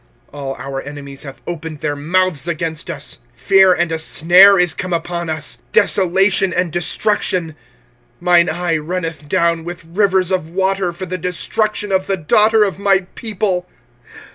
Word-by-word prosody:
25:003:046 145 - -9
All 135 -1 -4
our 135 0 -6
enemies 140 -1 -8
have 135 -3 -8
opened 160 -3 -6
their 150 -2 -1
mouths 175 +2 0
against 165 -1 -3
us. - - -5 0.2
25:003:047 - - -26
Fear 195 -1 +6
and 175 -1 -1
a 160 - -1
snare 180 +5 +5
is 175 -1 +2
come 185 -1 -4
upon 170 0 -3
us, 150 -6 -4
desolation 190 0 +3
and 180 -1 -1
destruction. 175 +1 0
25:003:048 155 - -15 0.7
Mine 175 -1 +4
eye 170 0 -1
runneth 165 -2 -5
down 170 0 +1
with 175 +1 -8
rivers 190 -2 +2
of 180 -4 -1
water 190 0 0
for 175 +2 -7
the 185 0 -5
destruction 205 +4 -2
of 190 0 +1
the 195 - 0
daughter 215 +6 +3
of 195 -3 -2
my 195 -1 +3
people. 200 -5 -2
175 Hz, 165 wpm, -17 LUFS, 160-190 Hz, 0.7 s, Fear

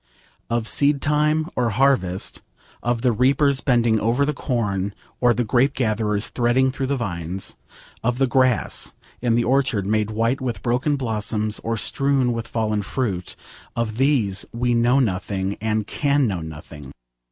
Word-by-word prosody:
Of 115 -1 -1
seed 140 +3 +3
time 150 +2 +1
or 120 -2 +1
harvest, 110 -6 +1 0.4
of 120 0 -1
the 125 - +4
reapers 135 +4 +2
bending 120 -4 +2
over 120 +6 +1
the 150 - -1
corn, 100 -8 -2 0.2
or 125 -1 +4
the 120 +1 +1
grape 130 +5 +2
gatherers 110 -3 0
threading 125 +2 +2
through 135 0 -3
the 140 0 0
vines, 90 -4 -4 0.5
of 125 +1 0
the 135 - +3
grass 130 -2 +1 0.3
in 120 -2 +2
the 120 - +2
orchard 130 -6 +1
made 105 +1 0
white 115 +5 0
with 125 -3 -4
broken 130 +5 +1
blossoms 110 -4 -1
or 115 0 -1
strewn 135 0 +1
with 115 -1 -4
fallen 110 -2 -1
fruit: 100 -4 -3 0.4
of 115 -2 -2
these 125 -8 +2
we 120 +1 0
know 120 +3 +3
nothing 95 -3 -1
and 110 -1 0
can 140 +4 +1
know 95 -6 -1
nothing. 75 -3 -9
120 Hz, 155 wpm, -22 LUFS, 105-130 Hz, 0.5 s, the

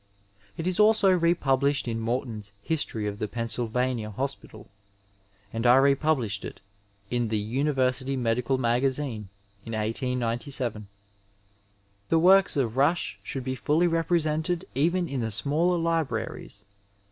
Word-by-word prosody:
It 165 - -4
is 185 +2 -1
also 210 -2 +5
republished 145 -6 +2
in 115 -1 -2
Morton's 115 -3 -3
History 140 -9 -2
of 105 0 -4
the 105 - -2
Pennst^vania 115 0 -2
Hospital, 125 -3 -5 0.9
and 115 +2 0
I 120 - +7
republished 135 -6 +2
it - - -8 0.5
in 120 -1 0
the 110 0 0
University 130 +3 0
Medical 125 +2 0
Magazine 125 -3 -1 0.3
in 115 - -7
1897. 120 0 -1 1.2
The 165 - +3
works 185 +1 +5
of 125 -3 -1
Rush 140 - +1
should 130 +6 -5
be 130 +1 -2
fully 150 +7 +1
represented 165 0 0
even 170 +6 +1
in 135 -3 -3
the 115 - -1
smaller 150 - +1
libraries. 160 -11 -3
130 Hz, 125 wpm, -26 LUFS, 115-155 Hz, 1.2 s, I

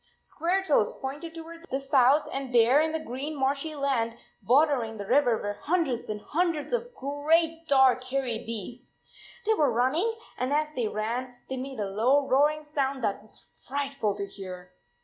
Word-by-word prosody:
Squaretoes 340 - 0
pointed 295 +5 -6
toward 330 +1 -10
the 270 - -1
south, 275 +1 +4
and 270 -1 -4
there 240 +5 +6
in 315 0 0
the 320 - -1
green 290 +1 -5
marshy 280 +4 0
land 260 -5 0 0.3
bordering 245 -1 +2
the 200 - -5
river 245 0 +3
were 205 0 -3
hundreds 285 - -1
and 210 -1 -4
hundreds 330 - -1
of 485 0 -2
great 320 +4 +1
dark 265 -3 +5
hairy 255 -3 -2
beasts. 230 +2 -8 0.5
They 440 - +4
were 295 - +2
run 245 +3 +2
ning, 425 +10 0 0.2
and 255 +2 -1
as 305 +1 0
they 245 -6 -1
ran, 235 +4 -3
they 265 - -3
made 265 -1 -6
a 205 - 0
low 240 +9 +2
roaring 300 +3 +3
sound 275 -3 -2
that 205 -1 -1
was 215 - -16
frightful 275 -6 -1
to 200 - -3
hear. 185 -2 -9
275 Hz, 170 wpm, -27 LUFS, 235-305 Hz, 0.5 s, there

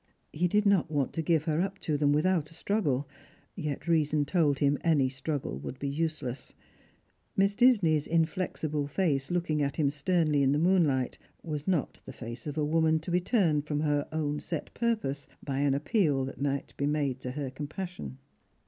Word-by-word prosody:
He 175 +4 +1
did 210 +4 +2
not 200 -5 +3
want 145 -4 -1
to 165 - -1
give 160 -1 +2
her 155 +1 0
up 195 +1 -2
to 155 - 0
them 145 0 +3
without 155 +1 +2
a 165 - -14
struggle, 150 -9 0 0.5
3'et 150 -5 -4
reason 155 -3 +2
told 150 -4 +2
him 140 0 +2
any 145 -6 +3
struggle 135 - -4
would 125 - -6
be 140 - -3
useless. 140 -4 -3 0.8
Miss 195 +1 +3
Disney'a 195 - +4
indexible 160 -3 0
face, 145 -4 0
looking 170 -4 0
at 140 -1 0
him 145 -3 +2
sternly 150 0 +1
in 135 0 +3
the - - +2
moonhght, 155 -7 +2 0.2
was 150 -3 -4
not 175 -7 0
the 135 - -9
face 115 +2 -7
of 150 +1 -5
a 150 - +1
woman 160 +1 +3
to 160 +3 -5
be 180 +1 +2
turned 165 - +2
from 150 -1 -1
her 145 -2 +1
own 150 -2 -1
set 165 -4 -5
purpose 215 - -1 0.2
by 135 -2 -2
an 140 -1 +2
appeal 145 - +1
that 135 - -8
might 140 -1 -2
be 140 - 0
made 145 -3 0
to 125 - -4
her 140 -2 -4
compassion. 155 +2 -6
150 Hz, 185 wpm, -29 LUFS, 140-170 Hz, 0.8 s, Disney'a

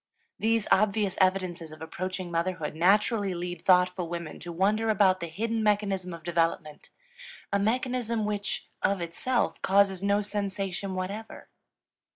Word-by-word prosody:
These 225 -1 +1
obvious 205 -1 +3
evidences 185 -4 +1
of 155 - -11
approaching 185 +2 -5
motherhood 170 -2 -1
naturally 200 +3 +2
lead 175 +1 -5
thoughtful 180 -1 +3
women 170 -2 -5
to 175 - -7
wonder 210 +6 +1
about 190 -3 +4
the 170 - -4
hidden 225 +7 -2
mechanism 200 -3 0
of 170 -1 -8
development, 165 -3 -1 0.6
a 200 - +3
mechanism 235 0 0
which, 205 -1 -3
of 200 -1 +1
itself, 175 +9 -1
causes 195 -1 +3
no 200 +1 +2
sensation 195 -2 -3
whatever. 200 +4 -6
190 Hz, 135 wpm, -28 LUFS, 175-210 Hz, 0.6 s, about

